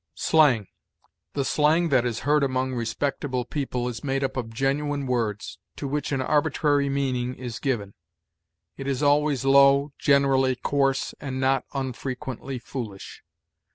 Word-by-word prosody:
SLANG. 145 -10 +3 0.7
The 140 -2 -1
slang 155 +4 +2
that 125 -4 +3
is 115 -2 -3
heard 150 +1 +2
among 130 -1 0
respectable 125 +2 -2
people 125 -3 -3
is 120 -2 -5
made 135 -1 -1
up 135 - -2
of 120 -4 -3
genuine 140 +3 -1
words, 115 -5 -2 0.2
to 140 - -5
which 145 +1 -2
an 135 -2 0
arbitrary 145 0 +1
meaning 130 -3 -1
is 120 -3 -6
given. 110 -8 -2 0.8
It 135 - -6
is 140 +1 -1
always 145 -2 +2
low, 140 +1 +5
generally 135 -2 +3
coarse, 135 +1 0
and 130 -2 -4
not 135 0 +1
unfrequently 130 0 -4
foolish. 115 -5 -7
135 Hz, 140 wpm, -25 LUFS, 125-140 Hz, 0.8 s, low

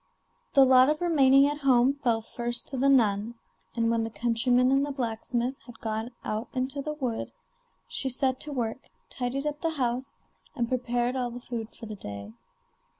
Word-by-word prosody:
The 275 -1 +8
lot 260 +1 +6
of 305 0 +1
remaining 275 -5 +5
at 290 +1 -2
home 260 -1 +4
fell 235 -5 0
first 240 +1 -1
to 270 - -5
the 275 +2 +3
nun, 225 -3 +3 0.4
and 230 -1 +1
when 230 -1 +1
the 225 - -3
countryman 245 +3 +2
and 275 +1 +3
the 290 - -2
blacksmith 240 0 -2
had 240 -2 -12
gone 220 +1 -3 0.2
out 215 +2 -3
into 260 +2 -2
the 300 +2 -4
wood, 250 -6 -3 0.6
she 270 - -1
set 260 0 0
to 300 - -6
work, 245 -2 -3 0.2
tidied 260 +3 -3
up 295 0 -3
the 325 -2 0
house, 250 0 -2 0.3
and 240 -4 0
prepared 245 0 -1
all 250 -2 -1
the 240 +1 -7
food 230 -2 -5
for - - -9
the 215 - -6
day. 100 - -8
250 Hz, 185 wpm, -27 LUFS, 230-270 Hz, 0.6 s, The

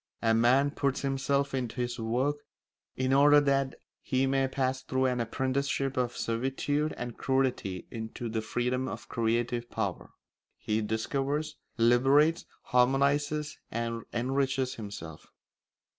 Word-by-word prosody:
A 115 0 +4
man 125 +5 +4
puts 140 -2 -1
himself 140 0 0
into 125 -4 -2
his 120 0 -2
work 125 +6 0 0.6
in 130 0 0
order 145 +2 +7
that 140 -2 +1 0.3
he 130 0 +1
may 135 0 +2
pass 130 0 -1
through 130 0 0
an 125 -1 +1
apprenticeship 135 +3 -1
of 125 -1 -1
servitude 135 +6 -1
and 120 -1 -6
crudity 130 -9 0
into 110 +1 -5
the 110 0 -2
freedom 125 +3 -1
of - - -6
creative 120 +1 -1
power. 100 -5 -3 0.5
He 110 +1 -1
discovers, 135 +8 -2 0.2
liberates, 135 +7 +4 0.2
harmonises, 140 +4 +1
and 115 0 -3
enriches 130 +1 0
himself. 100 -8 -8
130 Hz, 125 wpm, -29 LUFS, 115-140 Hz, 0.6 s, order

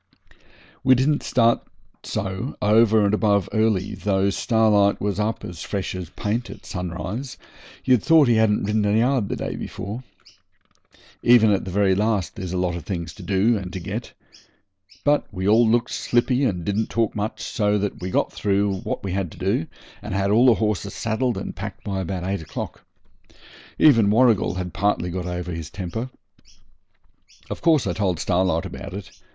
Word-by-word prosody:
We 130 0 +6
didn't 145 +4 +1
start 115 -2 +2 0.4
so 95 +7 -4
over 110 0 +4
and 100 - +1
above 100 -3 +2
early, 110 -4 +1
though 100 -1 0
Starlight 105 -2 +3
was 100 0 -2
up 110 +2 -2
as 90 -1 -8
fresh 100 -2 -3
as 90 -3 -6
paint 115 +6 -3
at - - -11
sunrise, 90 - -5 0.5
you'd 125 -4 +4
thought 160 0 +5
he 120 - +4
hadn't 110 -1 +2
ridden 105 +1 +1
a 105 +1 +2
yard 120 -2 +2
the - - -1
day - - -4
before. 110 +6 -6 1.2
Even 115 -3 +6
at 100 - 0
the - - -5
very 95 +1 +2
last 105 -2 0
there's 90 -2 -5
a 90 - -2
lot 90 -1 0
of 85 - -6
things 85 0 -4
to - - -12
do 105 +3 +2
and 90 -2 -7
to 95 - -4
get. 85 - -6 0.9
But 145 0 +1
we 95 -1 -3
all 110 +2 +5
looked 120 +1 +1
slippy 125 +3 +1
and 90 -8 -1
didn't 105 +3 -1
talk 115 -2 0
much, 105 +2 -3
so 105 -3 0
that 100 -1 -3
we 90 - -3
got - - 0
through 100 -1 0
what - - -4
we 95 - -3
had 95 -3 -2
to - - -15
do, 120 - 0 0.3
and 105 -2 -5
had 100 +1 +1
all 120 +5 +5
the 120 - +6
horses 105 -2 -2
saddled 115 0 -1
and 95 - -5
packed 100 -1 -7
by 100 -2 -3
about 95 -1 -3
eight 95 -1 -2
o'clock. 80 - -7 0.9
Even 115 -9 +5
Warrigal 115 -4 +3
had 90 -1 -4
partly 100 -3 0
got 90 0 -4
over 90 0 -4
his 80 -2 -6
temper. 105 +6 -5 1.4
Of - - -5
course 160 -5 +3
I 90 - -1
told 95 -4 -1
Starlight 90 -1 +1
about 95 +1 -7
it. 100 -2 -8
105 Hz, 180 wpm, -23 LUFS, 95-115 Hz, 1.4 s, We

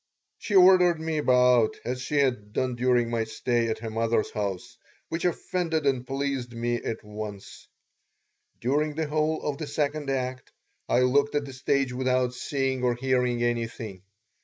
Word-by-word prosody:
She 205 - -3
ordered 180 -2 +6
me 160 -1 -2
about 125 -4 +4
as 125 +1 -3
she 150 - -4
had 120 -7 0
done 130 -1 0
during 120 -1 +2
my 115 -1 0
stay 115 +1 0
at 110 - -1
her 110 0 -6
mother's 115 0 0
house, 105 +4 -4 0.3
which 165 +2 -3
offended 165 -2 -1
and 130 -3 0
pleased 135 -3 -2
me 120 +1 -1
at 115 -1 -5
once. 105 -1 -8 0.9
During 145 +5 0
the 160 0 -1
whole 155 +1 0
of 145 -1 -2
the 155 - -4
second 145 0 -2
act 130 -1 -3 0.4
I 125 - +3
looked 140 +3 +2
at 145 -1 0
the 135 - -9
stage 135 0 0
without 130 -1 +1
seeing 130 0 -2
or 125 -1 +2
hearing 125 -1 0
anything. 115 -4 -3
130 Hz, 160 wpm, -26 LUFS, 120-145 Hz, 0.9 s, ordered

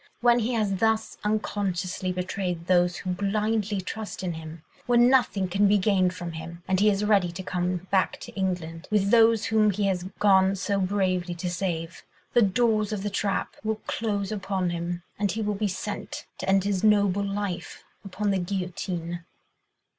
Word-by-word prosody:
When 240 0 +4
he 240 +2 -1
has 210 -4 0
thus 220 +2 +1
unconsciously 195 -3 -1
betrayed 180 -1 -3
those 180 -1 +3
who 185 - -4
blindly 210 +2 0
trust 210 +2 -6
in 175 -2 -1
him, 160 0 -9 0.2
when 240 0 +5
nothing 210 -7 +2
can 200 +3 +3
be 205 +1 +4
gained 185 -2 +2
from 175 -1 -5
him, 165 +1 -8
and 190 -1 +2
he 210 +1 +5
is 200 0 +1
ready 200 -5 +3
to 185 +2 -7
come 180 0 -2
back 190 -2 +2
to - - -9
England, 180 -3 -3
with 205 -1 +2
those 225 -1 +5
whom 215 -1 +3
he 205 +1 0
has 185 -2 0
gone 190 -1 +4
so 200 +1 -1
bravely 185 -2 0
to 175 +1 -3
save, 170 -2 -3 0.3
the 240 - +5
doors 215 0 +2
of 205 -2 -3
the 205 - -2
trap 200 0 -1
will 220 0 -1
close 205 -3 -2
upon 190 -3 -1
him, 175 0 -3 0.2
and 205 -1 +1
he 220 +1 -2
will 210 0 0
be 205 +1 -1
sent 185 - -5
to - - -3
end 195 -1 +4
his 200 -1 -1
noble 205 -2 +3
life 200 -2 -4 0.2
upon 205 +1 -2
the 195 - +1
guillotine." 175 -2 -4
195 Hz, 180 wpm, -26 LUFS, 180-210 Hz, 0.3 s, when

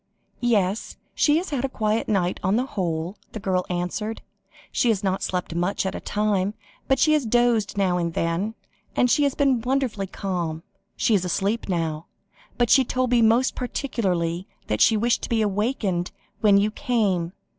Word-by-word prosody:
"Yes, 210 -3 +1 0.2
she 295 0 +3
has 350 0 -3
had 275 -3 -1
a 270 - 0
quiet 215 -2 -1
night 185 -4 +1
on 190 +3 +1
the 250 +3 +1
whole," 175 - -3 0.2
the 220 - -5
girl 185 -2 -1
answered; 180 +5 -3 0.5
"she 240 - +2
has 210 -3 +1
not 190 -1 0
slept 180 -2 -2
much 180 +4 -1
at 190 - -1
a - - -4
time, 205 -1 0 0.3
but 270 - +3
she 310 +3 +4
has 305 -2 +2
dozed 230 -3 +2
now 185 -3 +2
and 170 -1 -2
then, 175 +7 -1 0.4
and 245 - +3
she 295 - +3
has 280 - 0
been 270 -4 +2
wonderfully 250 -5 -1
calm. 175 -5 -3 0.3
She 230 - +1
is 195 -4 +3
asleep 200 +5 -1
now, 165 -3 -2 0.5
but 240 -2 +2
she 270 - +7
told 255 0 -1
me 240 -1 +4
most 230 +4 +4
particularly 185 - -2 0.2
that 105 0 -1
she 220 - +5
wished 235 +3 +1
to - - -5
be 225 -2 +2
awakened 205 -3 -1 0.3
when 205 -2 +5
you 205 +2 +2
came. 205 -10 0
210 Hz, 180 wpm, -24 LUFS, 180-240 Hz, 0.5 s, she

